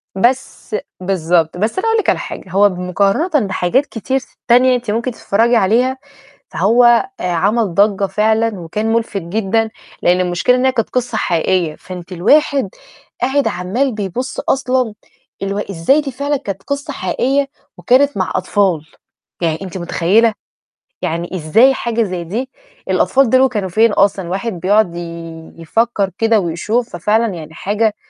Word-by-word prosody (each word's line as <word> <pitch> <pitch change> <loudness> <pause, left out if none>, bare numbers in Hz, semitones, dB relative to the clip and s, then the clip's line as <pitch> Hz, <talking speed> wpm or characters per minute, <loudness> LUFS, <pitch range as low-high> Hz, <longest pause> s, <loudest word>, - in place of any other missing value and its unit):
بس 240 +1 -1 0.3
بالضبط، 175 -3 +1
بس 215 - -1
أنا 435 - -1
أقول 450 0 +3
لِك 430 - 0
على - - +1
حاجة، - - -7
هو 200 +2 +4
بمقارنةً 200 - 0
بحاجات 190 +8 +1
كتير 265 +2 -2
ت 255 - -15 0.2
تانية 250 +1 +5
أنتِ 245 -3 -3
ممكن 235 +4 -1
تتفرّجي 230 +1 +1
عليها، 235 +5 +2 0.5
فهو 225 +8 +3 0.4
آآ، - - -6
عمل 200 +3 +1
ضَجّة 200 +1 +3
فعلًا 220 +1 +1
وكان 210 +7 -2
مُلفت 225 -3 -1
جدًا، 220 +5 -1 0.3
لإن 180 +1 +3
المشكلة 180 +7 +2
إن 255 +1 +1
هي 260 - +4
كانت 235 -3 -1
قصّة 245 -3 -2
حقيقية، 170 -2 0
فأنتِ 180 +1 -10
الواحد 270 - +2 0.5
قاعد 270 +3 +1
عمّال 195 +10 -1
بيبُصّ 215 +6 -4
أصلًا 255 -4 0 0.5
الو 195 +1 -2
إزاي 200 - +1
دي 280 -2 -5
فعلًا 285 +3 -1
كانت 195 -7 -6
قصّة 280 0 -4
حقيقية 265 +10 0 0.3
وكانت 275 +2 +3
مع 185 -4 -1
أطفال، 190 -6 +1 0.6
يعني 160 -1 -1
أنتِ 190 -1 -6
مُتخيّلة؟! 185 +6 +2 0.7
يعني 170 +3 -3
إزاي 205 - +4
حاجة 235 -2 -1
زي 180 -4 -4
دي؟ 230 +10 -4 0.4
الأطفال 270 -2 +3
دول 260 +2 +4
كانوا 210 -6 -3
فين 220 +5 +3
أصلًا؟ 195 -2 +2
الواحد 195 +6 -3
بيقعد 185 0 +1
ي-يفكر 170 +5 -3
كده 225 -1 +3
ويشوف، 210 +7 -1
ففعلًا 210 +4 +1
يعني 160 -2 -9
حاجة 210 +5 0
210 Hz, 150 wpm, -17 LUFS, 180-245 Hz, 0.7 s, تانية